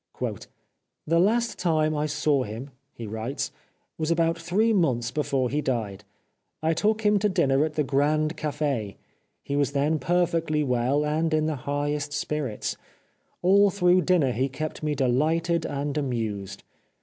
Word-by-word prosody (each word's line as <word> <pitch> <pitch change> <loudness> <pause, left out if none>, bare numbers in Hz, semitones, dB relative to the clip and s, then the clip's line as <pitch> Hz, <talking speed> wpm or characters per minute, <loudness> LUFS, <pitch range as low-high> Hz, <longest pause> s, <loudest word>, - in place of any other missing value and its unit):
" - - -49
The 165 +2 +2
last 230 +5 +1
time 155 -3 +1
I 150 +1 0
saw 150 -2 +1
him," 120 +5 -6 0.2
he 115 - -8
writes, 110 +6 -4 0.2
" - - -47
was 155 0 -1
about 165 0 +2
three 185 +7 +1
months 125 - +1
before 135 -3 0
he 150 +2 0
died. 110 -7 -3 0.6
I 160 +1 +2
took 215 +6 +1
him 210 -1 +4
to 210 +1 +2
dinner 145 -7 +2
at 155 -1 -3
the 150 - +2
Grand 150 +3 +1
Cafe. 145 -9 -2 0.5
He 140 - -3
was 145 0 +1
then 150 +3 +1
perfectly 165 -3 +1
well 130 +3 +1
and 160 +2 0
in 155 0 +1
the 155 -1 -1
highest 145 0 -1
spirits. 145 -6 -3 0.7
All 200 +3 +5
through 180 -1 +3
dinner 175 -8 +2
he 130 +3 0
kept 155 +4 -5
me 150 -1 -1
delighted 155 +6 +1
and 140 0 -3
amused. 110 -8 -3
150 Hz, 160 wpm, -26 LUFS, 135-165 Hz, 0.7 s, All